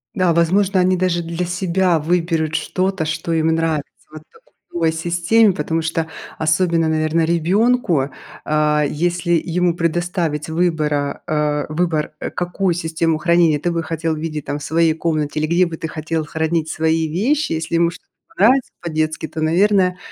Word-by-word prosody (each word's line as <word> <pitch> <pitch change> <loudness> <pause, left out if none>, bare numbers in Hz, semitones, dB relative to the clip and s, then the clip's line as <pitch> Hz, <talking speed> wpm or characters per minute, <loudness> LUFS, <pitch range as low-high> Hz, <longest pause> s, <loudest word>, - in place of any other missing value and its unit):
Да, 185 -3 +2
возможно, 185 +4 +2
они 185 +1 +3
даже 180 -1 0
для 170 +2 -3
себя 180 -1 +1
выберут 165 -1 0
что-то, 185 0 -1
что 155 +2 -2
им 160 0 +1
нравится 160 -2 +1 0.3
вот 155 - -10
в 455 - -27
такой 165 -2 +1
системе, 175 +6 +2
потому 160 +1 -2
что 160 0 -2 0.3
особенно, 165 +1 +1
наверное, 160 +1 +1
ребёнку. 170 - +2 0.4
А, 150 0 +2
если 175 +3 -1
ему 175 +1 +1
предоставить 170 -2 -1
выбора, 155 -4 0
э, 150 -1 0
выбор, 155 -1 -1
э, - - -4
какую 180 +1 -1
систему 160 -1 -1
хранения 170 -1 +3
ты 175 +4 -1
бы 165 -1 -2
хотел 160 0 -2
видеть 155 -2 -5
там 145 - -3
в - - -9
своей 165 0 +2
комнате 155 -2 -2
или 155 - 0
где 175 +3 +3
бы 165 -2 -6
ты 160 - -4
хотел 155 +1 -3
хранить 160 +1 -1
свои 160 0 0
вещи. 235 - 0
Если 160 +1 -2
ему 170 0 +3
что-то - - -15 0.3
понравится 250 +6 +3
по-детски, 155 -1 -2
то, 160 - -6
наверное, 180 +3 +2
165 Hz, 160 wpm, -19 LUFS, 155-175 Hz, 0.4 s, они